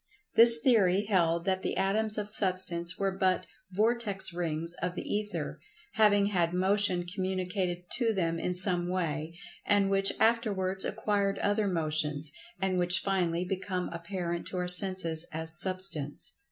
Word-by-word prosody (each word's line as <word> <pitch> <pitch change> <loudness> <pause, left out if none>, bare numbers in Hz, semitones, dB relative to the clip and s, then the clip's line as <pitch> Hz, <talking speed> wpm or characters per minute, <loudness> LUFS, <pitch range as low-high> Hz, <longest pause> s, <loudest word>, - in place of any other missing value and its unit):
This 230 0 +9
theory 205 -5 +2
held 170 -4 0
that 190 -1 -1
the - - -4
atoms 210 +3 0
of 210 -1 -3
Substance 185 -4 +2
were 195 -1 -1
but 190 -1 -1 0.3
vortex 210 -2 +1
rings 165 -1 -2
of 180 0 -3
the - - -6
Ether, 210 0 -4 0.3
having 205 -2 +3
had 175 -4 -1
motion 190 -1 0
communicated 185 -1 -4
to 235 -3 0
them 165 -5 -2
in 180 +1 -3
some 180 -1 +2
way, 165 -3 -4 0.3
and 200 -1 +1
which 195 0 +1
afterwards 200 -5 0
acquired 200 -2 -2
other 205 0 -1
motions, 155 -4 -2 0.3
and 190 -1 -1
which 175 0 0
finally 180 -3 -1
become 185 -1 -4
apparent 170 0 -5
to 185 - -6
our 180 0 -3
senses 180 -3 +4
as 160 +1 +4
Substance. 185 -6 -1
185 Hz, 145 wpm, -28 LUFS, 175-200 Hz, 0.3 s, This